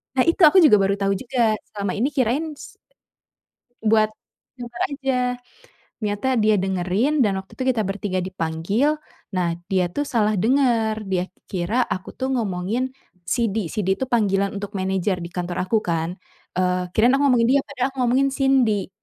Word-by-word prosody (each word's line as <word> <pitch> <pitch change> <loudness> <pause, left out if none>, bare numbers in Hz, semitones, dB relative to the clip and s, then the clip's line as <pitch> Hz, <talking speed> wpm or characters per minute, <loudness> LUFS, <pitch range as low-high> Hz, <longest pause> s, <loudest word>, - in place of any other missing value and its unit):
Nah, 255 - +4
itu, 335 +3 +1
aku 365 +2 +6
juga 210 -9 +7
baru 195 0 +2
tahu 195 0 0
juga, 225 0 0 0.2
selama 200 -2 -2
ini 235 +6 0
kirain, 290 +3 -1
s - - -13 1.0
buat 215 0 +4 0.5
kamera 240 -1 -4
aja. 270 -2 -2 0.9
Ternyata 210 +4 -1
dia 215 0 +4
dengerin, 190 +10 0
dan 200 -5 +2
waktu 190 0 -7
itu - - 0
kita 220 - +1
bertiga 190 -2 -2
dipanggil, 185 - 0 0.4
nah 175 -2 +1 0.2
dia 185 -2 +2
tuh 290 0 -2
salah 215 -3 +2
dengar. 225 -3 +2
Dia 185 -1 -1 0.2
kira 205 +7 0
aku 185 0 -5
tuh 265 +1 -2
ngomongin 220 +2 -1 0.4
Sidi, 220 -6 0
Sidi 190 0 -1
itu 265 - -2
panggilan 200 -4 +1
untuk 205 +1 -6
manajer 190 -1 -1
di 170 - -6
kantor 175 0 -4
aku, 220 0 +1
kan. 170 +1 -2 0.4
Eee, 180 0 0
kirain 240 +4 +5
aku 275 +1 +2
ngomongin 235 -2 +3
dia, 280 - +4
padahal 270 -2 -1
aku 270 - -23
ngomongin 255 +3 +3
Cindy, 260 -8 +2
215 Hz, 165 wpm, -22 LUFS, 190-255 Hz, 1.0 s, juga